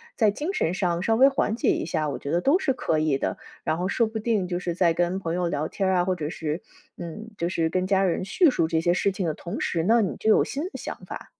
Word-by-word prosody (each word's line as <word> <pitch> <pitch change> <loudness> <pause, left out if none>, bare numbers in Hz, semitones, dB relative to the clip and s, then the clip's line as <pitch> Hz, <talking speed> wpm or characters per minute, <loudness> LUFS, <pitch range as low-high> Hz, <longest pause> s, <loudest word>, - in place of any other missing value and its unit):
在 215 -3 +3
精 305 - -3
神 170 - +1
上 175 -3 0
稍 225 - +2
微 265 +4 +7
缓 245 -5 0
解 245 - +1
一 335 -3 +1
下， 155 -1 -1
我 140 - -3
觉 140 - -5
得 175 +1 +2
都 285 - +4
是 310 -9 0
可 160 -10 -1
以 155 -3 +1
的。 - - -2 0.3
然 160 - 0
后 180 +2 -1
说 225 +3 +1
不 220 0 -5
定 215 -4 0
就 175 -1 -2
是 175 -1 -3
在 170 -1 +3
跟 175 +2 0
朋 165 -2 -3
友 180 -1 0
聊 155 -1 -1
天 195 - -2
儿 190 - +2
啊， 175 - +3
或 185 0 0
者 155 -3 -4
是 160 +1 -3 0.4
嗯， 195 +7 -7
就 170 - -1
是 165 -2 0
跟 185 +1 0
家 195 0 +2
人 185 0 0
叙 330 - +4
述 170 -11 +1
这 160 0 0
些 175 +1 +2
事 195 +2 +1
情 190 -1 -3
的 155 - 0
同 170 - -6
时 165 -2 0
呢， 225 +5 +4
你 195 - -1
就 220 - 0
有 - - +5
新 285 +3 -4
的 370 - -5
想 - - -5
法。 - - -8
185 Hz, 310 characters per minute, -25 LUFS, 170-220 Hz, 0.4 s, 微